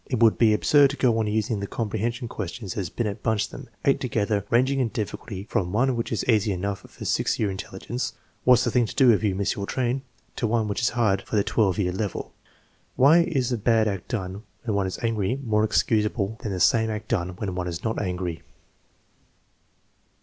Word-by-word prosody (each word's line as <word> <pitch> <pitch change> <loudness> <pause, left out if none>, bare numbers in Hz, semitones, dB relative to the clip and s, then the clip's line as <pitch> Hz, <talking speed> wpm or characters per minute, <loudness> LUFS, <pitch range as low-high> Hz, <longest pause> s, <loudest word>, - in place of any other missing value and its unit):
It 125 - -1
would 115 -2 +4
be 115 -2 +5
absurd 145 +5 +5
to 145 - -5
go 120 -3 +3
on 110 - 0
using 110 +1 0
the 100 - -4
com 115 +1 -3
prehension 120 +4 -2
questions 100 -1 -5
as 95 -5 -3
Binet 105 -1 -3
bunched 110 -2 0
them, 135 -3 -10 0.2
eight 140 - +3
together, 105 -4 0
ranging 130 +3 +3
in 125 - +2
difficulty 105 -3 -5
from 95 -4 -2
one 125 +5 +2
which 115 - -3
is 115 - -1
easy 110 -3 +3
enough 100 +1 -2
for - - -10
6 - - +1
year 105 -3 +1
intelligence 100 +6 -5 0.2
(" - - -39
What 125 - +7
9 - - +2
s 125 - +1
the - - 0
thing 125 -2 +3
to - - -8
do 130 -3 +6
if 105 -1 +2
you 100 -3 +1
miss 100 +1 0
your 100 -1 -4
train? 130 +1 -1 0.2
") - - -39
to 115 - 0
one 110 -1 +1
which 100 - -2
is 115 - +3
hard 100 -5 +2
for 110 - -5
the 100 - +3
12 105 -4 +1
year 90 -3 +1
level 100 +1 -4 0.3
(" - - -38
Why 145 +6 +6
is 140 -8 +1
a 120 - -1
bad 110 0 +3
act 100 -4 -3
done 95 -4 -4 0.2
when 115 -3 -2
one 100 -1 +1
is 95 - -4
angry 115 0 0
more 110 -3 +2
excusable 105 0 +1
than 105 - -3
the 95 - -3
same 110 +4 +4
act 110 0 -4
done 90 -5 -1
when 95 0 -4
one 90 0 -3
is 85 0 -5
not 110 0 -1
angry? 90 -3 -3
110 Hz, 230 wpm, -25 LUFS, 100-120 Hz, 0.3 s, What